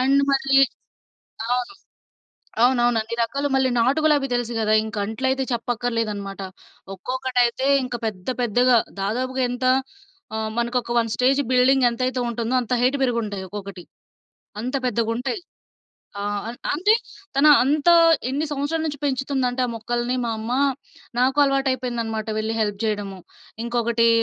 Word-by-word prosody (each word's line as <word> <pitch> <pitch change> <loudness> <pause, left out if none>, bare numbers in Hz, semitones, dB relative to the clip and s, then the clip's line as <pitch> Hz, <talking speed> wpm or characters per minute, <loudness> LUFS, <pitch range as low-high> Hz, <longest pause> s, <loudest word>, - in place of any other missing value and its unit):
And 275 +2 +3
మళ్ళీ 270 0 +2 1.0
అవును. 250 +10 -3 0.9
అవునవును. 240 -2 +3
అన్నీ 225 +1 -6
రకాలు. 280 +5 -1
మళ్ళీ 265 -1 +2
నాటు 260 +6 +2
గులాబీ 290 -3 +3
తెలుసు 240 -1 -1
గదా! 215 0 +2
ఇంక 220 -1 -7
అంట్లైతే 260 +4 -1
చెప్పక్కర్లేదనమాట. 230 -4 -2 0.5
ఒక్కొక్కటైతే 255 +3 0 0.2
ఇంక 250 - -6
పెద్ద 185 -2 -6
పెద్దగా 245 +2 +3 0.3
దాదాపుగా 255 +6 -1
ఎంత 245 +1 -4 0.7
ఆహ్, 220 0 -2
మనకొక 240 +1 -1
1 230 -1 0
స్టేజ్ 270 +3 +3
బిల్డింగ్ 255 +1 +4
ఎంతైతే 255 +2 -2
ఉంటుందో 235 +1 -2
అంత 240 - -6
హైట్ 255 +3 +3
పెరిగుంటాయి, 220 -6 -1
ఒక్కొక్కటి 200 -3 -8 0.8
అంత 250 +4 -4
పెద్దగుంటాయి. 240 - -1 0.8
ఆ! - - -3 0.3
అం 235 - -5 0.2
అంతే 390 +8 +3 0.4
తను 295 +2 +6
అంతా 300 +5 +3 0.4
ఎన్ని 290 +4 -1
సంవత్సరాలు 295 +3 -2
నుంచి 290 -2 -4
పెంచుతుందంటే 265 -2 -1
ఆ - - -6
మొక్కల్ని 240 +2 -2
మా 235 - -1
అమ్మ, 220 +2 -4 0.7
నాకు 260 +3 +2
అలవాటయిపోయిందనమాట 250 -5 -1
వెళ్లి 220 +1 -2
హెల్ప్ 205 -2 -1
జేయడము. 205 -3 -2 0.5
ఇంకొకటీ 235 -1 +1
245 Hz, 130 wpm, -23 LUFS, 225-265 Hz, 1.0 s, తను